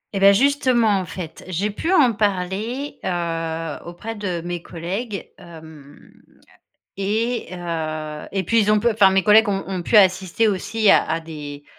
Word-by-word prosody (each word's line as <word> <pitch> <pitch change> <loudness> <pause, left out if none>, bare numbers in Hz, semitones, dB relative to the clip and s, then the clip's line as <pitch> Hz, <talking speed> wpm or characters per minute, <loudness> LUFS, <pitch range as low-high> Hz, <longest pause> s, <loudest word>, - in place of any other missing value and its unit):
Et - - 0
bah, 200 0 +7
justement, 240 -3 +3
en 185 - -4
fait, 165 -1 -8
j'ai 190 +4 -2
pu 325 - -3
en 270 -10 +5
parler, 210 +7 -2
heu, 165 -2 -3
auprès 210 +6 -7
de 185 -5 -4
mes 175 -1 -4
collègues, 195 +7 -5
hem 160 -4 -14 0.9
et 220 +5 -1
heu 155 -3 -5
et 190 -2 -2
puis, 230 +5 +3
ils 210 0 +2
ont 215 - +4
pu 235 - +2
enfin, 205 -4 +4
mes 190 0 +2
collègues 215 +1 +6
ont 195 -4 -1
ont 185 -2 -4
pu 220 - +2
assister 190 +2 +3
aussi 210 +2 +1
à - - +6
à 160 +1 -1
des 145 -3 -9
190 Hz, 170 wpm, -21 LUFS, 165-215 Hz, 0.9 s, bah